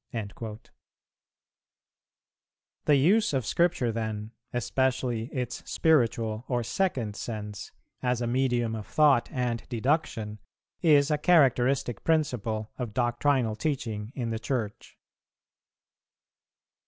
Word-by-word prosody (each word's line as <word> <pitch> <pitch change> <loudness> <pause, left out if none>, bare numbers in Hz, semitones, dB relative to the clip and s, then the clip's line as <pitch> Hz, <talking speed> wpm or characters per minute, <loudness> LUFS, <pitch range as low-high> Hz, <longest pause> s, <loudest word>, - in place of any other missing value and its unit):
"[346:2] 110 +1 -6 2.2
The 150 - +5
use 180 +8 +3
of 130 -4 0
Scripture 170 -8 +1
then, 110 -1 -4 0.2
especially 125 -1 0
its 125 -1 -4
spiritual 115 -7 +2
or 120 -2 0
second 120 - -1
sense, 105 -3 -6 0.3
as 125 -1 0
a 120 - -1
medium 120 -2 +1
of 110 -2 -5
thought 145 -6 +4
and 125 -4 -1
deduction, 120 -4 -1 0.4
is 150 -3 +5
a 150 - +1
characteristic 135 - +3
principle 120 -9 0
of 115 -4 -4
doctrinal 120 -1 +1
teaching 115 -6 -3
in 120 -4 -2
the 110 - -2
Church. 115 -4 -4
120 Hz, 105 wpm, -28 LUFS, 110-140 Hz, 2.2 s, The